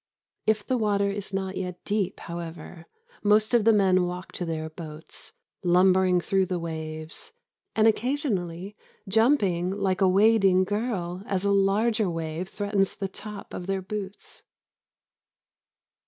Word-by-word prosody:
If 215 -1 +2
the 255 -1 0
water 200 -2 +1
is 200 -1 -5
not 190 -1 -3
yet 180 -1 -5
deep, 205 -3 -1
however, 170 0 -8 0.3
most 215 +2 +3
of 235 -3 +4
the 225 - +7
men 185 -4 +4
walk 180 +1 -6
to 175 - -4
their 160 -1 -3
boats, 155 -1 -9 0.3
lumbering 185 0 +4
through 190 +1 +1
the 180 - -1
waves, 160 -1 -5 0.4
and 220 0 +5
occasionally 210 - -1 0.3
jumping 195 -5 +3
like 195 -1 -1
a 190 - +5
wading 195 -1 +5
girl 190 -3 -2
as 195 0 -1
a 200 - +3
larger 200 +2 +2
wave 165 +2 -4
threatens 200 -2 0
the 195 - -3
tops 210 +1 -9
of 180 - -6
their 195 -1 -1
boots. 200 0 -7
190 Hz, 140 wpm, -26 LUFS, 175-210 Hz, 0.4 s, the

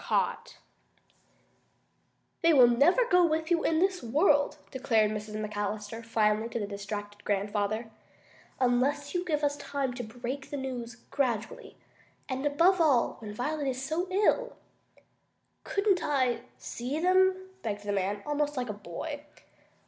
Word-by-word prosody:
CAUGHT - - -1 1.8
"They 335 0 +5
never 275 - +6
will 470 - -7
go 360 0 +6
with 320 0 0
you 335 -1 +3
in 320 - +2
this 375 +1 +1
world," 285 - +3
declared 225 -5 +2
Mrs. 215 0 -5
McAllister 210 +1 -4
finally 220 0 +1
to 235 - -3
the 205 - -2
distracted 205 +1 -6
grandfather, 205 +2 -1 0.7
"unless 270 +3 +1
you 355 -1 0
give 305 -4 -1
us 290 0 +2
time 275 -4 -3
to 245 0 -5
break 245 +5 -6
the 290 - -4
news 245 -3 -5 0.2
gradually. 240 -6 -2 0.5
And 265 +1 -1
above 340 +6 +4
all, 275 -7 +3
when 215 -2 -7
Violet 285 +7 -2
is 260 0 -2
so 330 +6 -1
ill." 425 +6 +2 1.1
"Couldn't 400 -2 +1
I 255 -4 +1
see 255 +6 -4
them?" 375 +1 +3
begged 205 -2 -4
the 205 - -2
man, 200 +1 -1
almost 295 -1 -1
like 250 -2 -2
a - - -2
boy. 250 - -6
260 Hz, 140 wpm, -29 LUFS, 215-310 Hz, 1.8 s, never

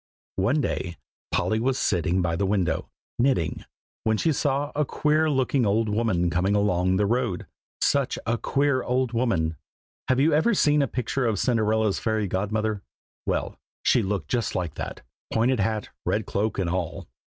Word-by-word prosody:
One 120 +11 +2
day 85 -8 -2 0.4
Polly 110 - +1
was 130 +3 +1
sitting 90 - +1
by 85 -1 0
the 100 +3 0
window, 95 -5 0 0.3
knitting, 120 - +1 0.4
when 110 -1 +2
she 160 - +2
saw 145 +1 0
a 150 - +2
queer 155 +2 +1
looking 135 -2 +1
old 110 +1 +2
woman 105 -6 +1
coming 95 +4 +1
along 95 -2 +2
the 100 +2 +2
road; 115 -4 0 0.4
such 140 -2 +2
a 115 0 0
queer 140 -2 +1
old 125 -1 0
woman. 95 -10 0 0.5
Have 130 0 +2
you 150 +3 +4
ever 200 +10 +3
seen 150 -4 +4
a 140 - +2
picture 125 +1 -1
of 110 -3 0
Cinderella's 110 -2 +1
fairy 110 -2 0
godmother? 105 +2 -1 0.5
well, - - -2 0.2
she 125 - +4
looked 95 -7 -2
just 120 -4 -1
like 85 -5 -2
that, - - -6 0.3
pointed 120 +2 +2
hat, 105 +1 -1
red - - 0
cloak, 105 +1 -1
and 95 - 0
all. 90 -2 -3
110 Hz, 165 wpm, -25 LUFS, 95-130 Hz, 0.5 s, you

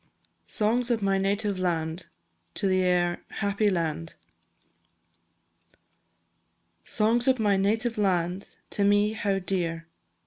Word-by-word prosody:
SONGS 235 +3 +1
OF 230 -4 0
MY 195 -1 +2
NATIVE 200 0 0
LAND. 165 -1 -2 0.6
AIR 180 -2 +1
"Happy 200 +1 0
Land." 165 -3 -2 2.7
Songs 230 +4 +2
of 260 -1 +4
my 210 -3 +2
native 220 +4 0
land, 185 -1 -1
To 200 - 0
me 205 +1 +3
how 205 -3 -1
dear! 175 -3 -2
195 Hz, 100 wpm, -27 LUFS, 180-210 Hz, 2.7 s, of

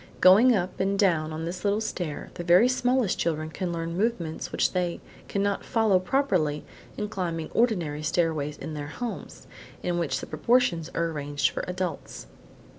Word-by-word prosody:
Going 220 +7 +7
up 180 -1 -2
and 195 +1 +1
down 165 -6 +2
on 160 +1 -4
this 180 +2 -5
little 205 +1 +2
stair, 175 -8 -4
the 175 - -6
very 180 +7 +6
smallest 250 -4 +1
children 155 -1 -1
can 180 +2 -3
learn 165 0 -3
movements 185 -6 -2
which - - +1
they 180 -2 -1 0.3
cannot 200 0 -1
follow 220 -6 +3
properly 185 - 0 0.3
in 210 - -2
climbing 170 -5 -3
ordinary 175 -11 +1
stairways 155 -2 0
in 160 - -6
their 145 -1 -5
homes, 235 +11 -6 0.4
in 175 -1 0
which 165 -4 -1
the - - -6
proportions 230 -10 +1
are 165 0 0
arranged 145 -2 -1
for - - -4
adults. 180 -3 -4
175 Hz, 165 wpm, -26 LUFS, 160-205 Hz, 0.4 s, Going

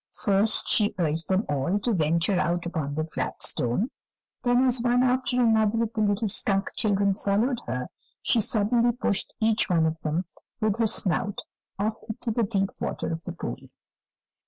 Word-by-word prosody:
First 205 0 +2
she 210 -1 +2
urged 165 -2 -1
them 190 +3 +2
all 145 +7 0
to 225 +3 0
venture 170 +2 +1
out 175 +2 0
upon 155 -5 -3
the 155 - 0
flat 160 - -4
stone, 145 - 0 0.5
then, 245 0 +3
as 250 -2 +2
one 245 +1 +3
after 255 0 +1
another 225 -1 +3
of 230 0 -4
the 220 - -1
little 210 +1 +1
skunk 195 0 +1
children 200 -2 +2
followed 215 +6 +1
her, 125 +1 -3 0.4
she 230 - +3
suddenly 230 +2 +2
pushed 210 -5 -1
each 220 -2 +2
one 165 -3 +3
of 160 0 -1
them 160 +4 -1 0.3
with 215 -1 0
her 225 - +3
snout 200 0 0 0.4
off 215 +2 -1
into 225 +2 -2
the 235 - 0
deep 195 -2 0
water 160 0 -2
of 165 +1 -6
the 180 - -4
pool. 175 - -5
205 Hz, 175 wpm, -26 LUFS, 170-230 Hz, 0.5 s, then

